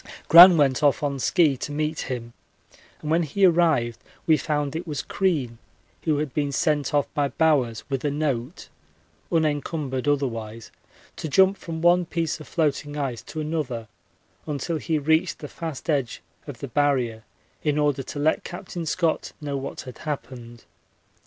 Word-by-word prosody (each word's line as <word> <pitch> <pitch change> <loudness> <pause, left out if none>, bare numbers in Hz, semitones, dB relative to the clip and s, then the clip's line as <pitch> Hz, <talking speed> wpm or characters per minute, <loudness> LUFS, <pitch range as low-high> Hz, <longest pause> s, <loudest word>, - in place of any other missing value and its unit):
Gran 175 +2 +10
went 135 -3 +2
off 145 0 +3
on 140 -2 -1
ski 155 0 +3
to 145 - -5
meet 155 +1 -2
him, 120 -2 -5 0.7
and 155 - -3
when 165 +2 +3
he 170 +5 +2
arrived 160 -10 +2 0.3
we 160 - +5
found 150 -1 -2
it 170 +2 -4
was 150 -3 -3
Crean, 145 - -1 0.5
who 155 -3 +2
had 150 -2 -3
been 145 -2 -1
sent 150 0 0
off 145 -2 +2
by 145 -2 +1
Bowers 135 -8 +1
with 135 -2 -3
a 145 - +1
note, 140 -1 -3 0.6
unencumbered 150 -4 -1
otherwise, 115 -6 -2 0.5
to 160 - -4
jump 190 +6 +5
from 165 -4 -7
one 175 0 +4
piece 165 -1 -2
of 155 - -11
floating 150 -2 -1
ice 130 -6 -3
to 155 - -6
another 145 -8 -3 0.6
until 150 +3 -2
he 160 0 -1
reached 160 +4 +1
the 150 - -8
fast 160 -1 -7
edge 140 -7 -1 0.2
of 135 -5 -9
the 140 - -4
Barrier 125 -5 0 0.4
in 150 -1 0
order 145 -2 +1
to 135 - -8
let 155 +2 +1
Capt. 175 - -8 0.2
Scott 165 0 0
know 145 -2 -4
what 135 0 -5
had 130 -2 -11
happened. 120 -6 -7
145 Hz, 165 wpm, -24 LUFS, 135-160 Hz, 0.7 s, Gran